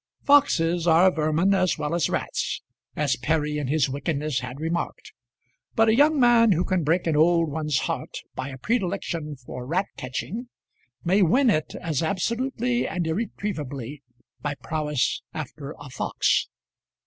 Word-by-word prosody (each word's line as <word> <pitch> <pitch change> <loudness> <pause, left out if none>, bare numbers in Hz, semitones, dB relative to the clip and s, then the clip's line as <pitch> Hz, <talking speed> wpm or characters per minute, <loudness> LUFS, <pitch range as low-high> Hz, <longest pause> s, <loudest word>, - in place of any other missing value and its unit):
Foxes 175 - +3
are 170 +3 +6
vermin 160 +4 +2
as 185 -2 +2
well 150 +2 -2
as 170 -5 +1
rats, - - -2 0.3
as 140 -4 +1
Perry 150 +2 0
in 145 - -3
his 145 0 +2
wickedness 140 0 -2
had 125 +1 -7
remarked; 165 +2 -3 0.6
but 225 0 +4
a 220 - +4
young 295 +3 +4
man 235 -3 +6
who 175 +1 0
can 185 -3 0
break 165 +4 +1
an 165 -2 +1
old 165 0 +3
one's 150 -2 -1
heart - - -3 0.2
by 130 - -4
a 135 - -8
predilection 175 - -2
for 125 -1 -8
rat 175 +9 0
catching 205 - -5 0.5
may 190 +4 +3
win 240 - +4
it 155 -5 -1
as 160 -5 -1
absolutely 240 +7 0
and 180 -2 -2
irretrievably 150 - -4 0.4
by 145 0 -2
prowess 150 -4 -1
after 150 -1 -6
a 145 -2 -10
fox. - - +1
160 Hz, 150 wpm, -25 LUFS, 150-195 Hz, 0.6 s, are